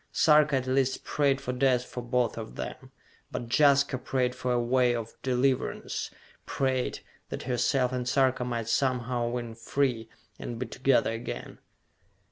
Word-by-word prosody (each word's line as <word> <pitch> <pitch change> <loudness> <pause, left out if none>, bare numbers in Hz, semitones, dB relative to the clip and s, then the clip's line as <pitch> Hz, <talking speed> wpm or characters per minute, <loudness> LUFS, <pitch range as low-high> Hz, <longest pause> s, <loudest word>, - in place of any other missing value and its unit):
Sarka 150 -2 +4
at 130 -1 0
least 130 0 +1
prayed 140 -2 +1
for 125 - -4
death 125 -1 +2
for 125 - -6
both 120 -1 0
of - - -7
them; - - -7 0.4
but 120 - -5
Jaska 140 -2 +4
prayed 125 -1 0
for 125 0 -3
a 120 - +2
way 120 0 +2
of 115 -1 -5
deliverance, 130 0 -1 0.4
prayed 130 -2 -1 0.3
that - - -5
herself 125 +1 +1
and 125 -1 -2
Sarka 130 -1 +2
might 120 -2 -3
somehow 125 -1 0
win 120 -1 -4
free, 115 -1 -1 0.3
and 120 - -5
be 130 - -3
together 130 -3 +2
again. 115 +1 -6
125 Hz, 150 wpm, -28 LUFS, 120-135 Hz, 0.4 s, Sarka